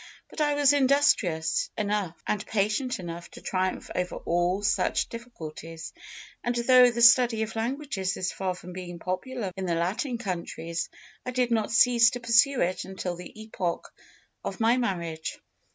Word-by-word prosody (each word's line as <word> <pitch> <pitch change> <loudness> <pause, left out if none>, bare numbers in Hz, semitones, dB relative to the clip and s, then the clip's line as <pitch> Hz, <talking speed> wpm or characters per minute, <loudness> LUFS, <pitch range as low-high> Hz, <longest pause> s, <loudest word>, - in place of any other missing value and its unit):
But - - -4
I 295 -1 +2
was 290 -1 +5
industrious 275 - +2
enough 205 -5 -1
and 210 -1 -1
patient 220 +5 0
enough 170 -1 -7
to - - -12
triumph 185 0 -2
over 180 0 -2
all 175 +3 0
such - - +1
difficulties, 165 -8 -8 0.5
and 240 0 -1
though 250 +1 +6
the 235 0 0
study 235 -2 +6
of 220 +1 -6
languages 225 -5 -2
is 185 - -1
far 185 -1 -2
from 180 0 -10
being 175 -1 -7
popular 195 +5 -4
in 190 -1 -4
the 170 - +1
Latin 210 - -1
countries, 170 -5 -4 0.3
I - - -4
did 250 -1 0
not 220 -2 +1
cease 235 0 +6
to 245 - -5
pursue 240 +3 +4
it 180 +2 0
until 190 -2 -5
the 180 +4 -11
epoch 185 -5 -4 0.5
of - - -5
my 230 +2 +4
marriage. 170 -9 -3
210 Hz, 160 wpm, -27 LUFS, 180-245 Hz, 0.5 s, though